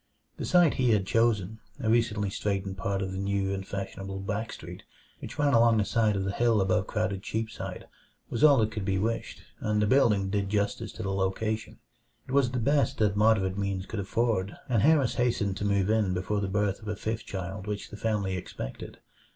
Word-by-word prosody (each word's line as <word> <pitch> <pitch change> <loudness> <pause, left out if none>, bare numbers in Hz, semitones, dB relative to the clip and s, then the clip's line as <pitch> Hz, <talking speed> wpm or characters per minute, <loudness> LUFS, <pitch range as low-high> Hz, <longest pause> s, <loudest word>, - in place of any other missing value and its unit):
The - - -4
site 175 -4 +5
he 125 -3 +4
had 100 -3 +2
chosen 110 -1 +1 0.2
a 120 - -3
recently 110 -3 +1
straightened 100 -1 -2
part 95 +1 -2
of 95 - -4
the 95 - -4
new 100 0 0
and 95 0 -3
fashionable 95 0 -5
Back 105 +3 -3
Street, - - -9 0.4
which - - -8
ran 145 -1 +2
along 115 -1 +5
the 105 - +2
side 110 -2 +2
of 95 - -1
the 95 - -1
hill 115 +1 +2
above 95 +1 +1
crowded 105 -3 -1
Cheapside 110 +2 -4 0.4
was 120 - -2
all 145 -3 +8
that 110 -2 +2
could 105 -3 -4
be 95 0 0
wished, 115 +4 -2 0.2
and 105 0 0
the 105 - +3
building 105 -5 +3
did 100 -1 0
justice 105 +1 -1
to - - -6
the 95 0 -2
location. 110 +3 -2 0.5
It - - -8
was 135 -2 +3
the 125 - -3
best 140 +5 +2
that 105 -2 +2
moderate 100 -3 +3
means 100 -1 -2
could 110 - -5
afford, 100 -1 0
and 115 -5 +2
Harris 145 -3 +4
hastened 105 -5 +1
to 105 - -3
move 100 0 +2
in 105 -4 +2
before 100 +3 -1
the 100 - -1
birth 105 +1 0
of 105 - -11
a 105 - -2
fifth 110 +2 -4
child 95 +1 -5
which 105 -1 -4
the - - -7
family 105 -3 -1
expected. - - -7
105 Hz, 210 wpm, -28 LUFS, 95-115 Hz, 0.5 s, all